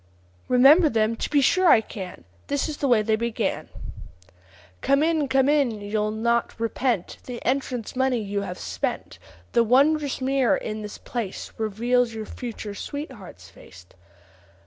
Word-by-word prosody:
"Remember 280 +7 +6
them! 225 -2 +1
to - - -3
be 290 -2 +3
sure 370 +6 +4
I 230 - +7
can. 190 - -8 0.2
This 285 -1 -1
is 305 -2 -5
the 280 - -1
way 235 -4 +4
they 220 0 +2
began: 235 +1 -2 1.1
'Come 275 +2 +3
in! 315 -3 +1
come 265 0 +3
in! 280 -7 +2
you'll 210 +1 -1
not 235 +2 -1
repent 230 -3 -1
The 245 -2 -6
entrance 255 -3 -2
money 260 -1 +1
you 205 -2 -2
have 180 -2 -5
spent; - - -4 0.3
The 235 - +4
wondrous 280 +4 +3
mirror 265 -1 +2
in 215 0 -5
this 210 -1 -7
place 230 -6 -5
Reveals 230 +2 0
your 220 -1 -5
future 225 -4 -7
sweetheart's 210 - -8
face. 90 -1 -15
235 Hz, 150 wpm, -24 LUFS, 215-275 Hz, 1.1 s, I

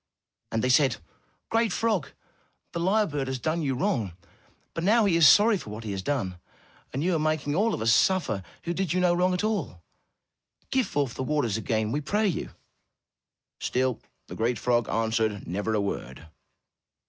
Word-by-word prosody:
And 115 - -1
they 130 - +2
said: 130 -1 +4 0.5
"Great 225 -2 +2
frog, 210 -7 0 0.6
the 170 - -4
lyre 205 +5 +3
bird 145 -6 -3
has 130 0 -2
done 155 +7 -1
you 135 -4 -1
wrong, 125 - -1 0.6
but 165 - -3
now 220 +4 +4
he 190 -4 +3
is 165 -3 +7
sorry 205 - +6
for - - -9
what 105 +2 -7
he 105 - -4
has 95 -1 -3
done, 95 -7 -2 0.5
and 135 - -2
you 180 +1 +1
are - - +1
making 155 -2 0
all 210 +7 +2
of - - -4
us 115 +1 +4
suffer 165 - +2 0.2
who 170 - -2
did 185 -2 -1
you 185 - +1
no 180 -1 +3
wrong 180 +1 +2
at 180 - -2
all. 165 - -2 0.9
Give 260 -2 +2
forth 140 -5 -1
the - - -5
waters 130 -6 0
again, 110 0 -1
we 145 - -1
pray 210 +8 +1
you.'' 180 - -2 1.1
Still 130 -1 0 0.3
the - - -10
great 115 +1 0
frog 120 -2 +1
answered 110 -2 0
never 105 +5 -2
a - - +2
word. 80 -7 -5
145 Hz, 185 wpm, -27 LUFS, 110-180 Hz, 1.1 s, is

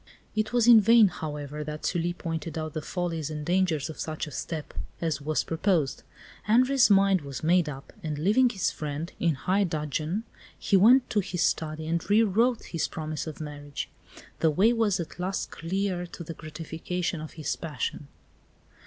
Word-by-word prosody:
It 215 0 0
was 240 -2 +3
in 235 -2 +9
vain, 225 0 +6
however, 150 -3 -5
that 150 0 -6
Sully 175 -1 0
pointed 165 -2 -4
out 155 -1 -4
the 155 - -3
follies 165 -1 -3
and 150 -1 -5
dangers 175 -5 +1
of 160 - -9
such 155 -1 -3
a 150 - -9
step 155 +1 -5 0.3
as 160 -4 -1
was 155 +2 0
proposed. 160 -4 0 0.4
Henri's 255 +4 +4
mind 195 -2 +5
was 140 -1 -7
made 170 0 +3
up, 135 -1 -9
and 155 -4 -3
leaving 215 - +4
his 195 -6 0
friend, 155 +3 -5
in 165 -3 +2
high 190 +8 +1
dudgeon, 155 +3 -2 0.3
he 200 - +1
went 240 +7 +6
to 210 - +2
his 180 -3 -1
study 155 0 -1
and 170 +3 -2
re 215 +3 +5
wrote 225 +4 +2
his 165 - -2
promise 155 -1 -5
of 155 - -7
marriage. 145 -2 -6 0.5
The 160 - +4
way 195 +10 +4
was 220 -5 +1
at 170 +1 -6
last 185 +2 -2
clear 180 +1 -2
to 170 - -9
the 165 - -6
gratification 160 +2 -4
of 155 - -8
his 155 -2 -2
passion. 150 -2 -4
165 Hz, 180 wpm, -27 LUFS, 155-195 Hz, 0.5 s, in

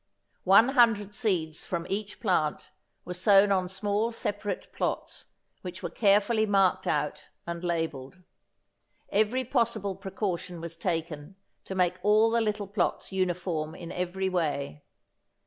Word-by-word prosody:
One 200 +6 +7
hundred 225 -6 +3
seeds 180 -9 -1
from 170 -2 -3
each 205 +1 -4
plant 175 -8 0 0.3
were 180 - -5
sown 200 +2 +5
on 185 -2 +1
small 205 +4 -1
separate 205 -3 -4
plots - - -3 0.3
which 180 +1 -8
were - - -3
carefully 210 +1 +3
marked 195 -2 +2
out - - -1 0.2
and 170 0 -5
labelled. 165 -3 -3 0.9
Every 220 +5 +2
possible 225 -6 0
precaution 190 -2 -4
was 165 0 -7
taken 165 -1 -3 0.3
to 190 - -5
make 180 -1 +1
all 215 +3 +4
the 235 0 +2
little 210 -2 -1
plots 195 0 -1
uniform 175 -4 -2
in 170 - -8
every 180 +2 -2
way. 150 - -2
190 Hz, 130 wpm, -28 LUFS, 175-210 Hz, 0.9 s, One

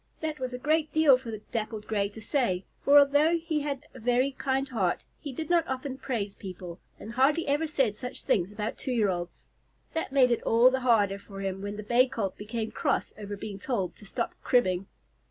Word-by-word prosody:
That 310 -1 -3
was 255 -1 -3
a 250 - -4
great 305 +4 +1
deal 310 -4 +6
for 250 -2 -6
the 215 -1 -6
Dappled 220 -2 -3
Gray 200 -2 0
to 210 - -11
say, 210 -8 0 0.2
for 285 +1 +7
although 290 +4 +5
he 325 -2 -1
had 285 -2 -3
a 260 - -11
very 245 +4 +2
kind 270 0 -1
heart, 200 -9 0 0.2
he 285 - -6
did 315 +4 -5
not 345 0 +3
often 265 0 -4
praise 215 -7 -2
people, 180 -3 -8 0.2
and 220 - -8
hardly 275 +7 +3
ever 295 +3 +1
said 270 -8 +1
such 250 +4 -7
things 185 0 +1
about 210 +1 -4
two 265 - -3
year 215 -4 +2
olds. 175 -1 -4 0.5
That 325 -4 -2
made 260 -3 +5
it 235 - +1
all 235 +3 +5
the 260 - 0
harder 210 -6 +3
for 195 -1 -10
him 195 0 -3
when 205 +1 -5
the 210 - -5
Bay 240 +4 +4
Colt 225 -7 -3
became 220 +1 -4
cross - - -1
over 205 -1 -6
being 200 -1 -6
told 195 -6 -2
to 210 - -14
stop 235 - -2
cribbing. 190 -6 +2
240 Hz, 215 wpm, -28 LUFS, 205-275 Hz, 0.5 s, for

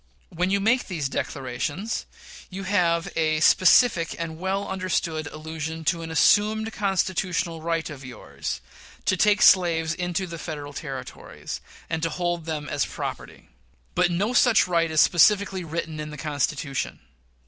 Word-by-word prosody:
When 180 +2 -1
you 200 +1 +2
make 230 +5 +2
these 160 -7 -2
declarations, 145 - -3 0.4
you 195 +1 -6
have 175 -4 +1
a 155 -1 +1
specific 185 +1 +5
and 165 -1 -5
well 190 +2 -1
understood 175 -4 -2
allusion 160 +1 -6
to 170 +1 +1
an 165 - -6
assumed 215 +6 +3
constitutional 185 -4 -1
right 165 0 -1
of 145 -3 -9
yours 125 -4 -6 0.4
to - - +3
take 205 +2 +3
slaves 165 -4 +5
into 180 +1 -2
the 170 -2 -8
Federal 145 -3 -6
Territories, 135 -4 -7 0.3
and 160 -1 -2
to 165 - 0
hold 175 -1 -2
them 155 -2 -3
there - - -6
as - - +1
property. - - -7 0.4
But 175 - +3
no 200 +7 0
such 230 -6 +5
right 170 -2 +2
is 155 -1 +4
specifically 195 +1 +4
written 165 -1 -4
in 150 0 -5
the 150 - -8
Constitution. 145 -2 -2
170 Hz, 150 wpm, -25 LUFS, 155-190 Hz, 0.4 s, specific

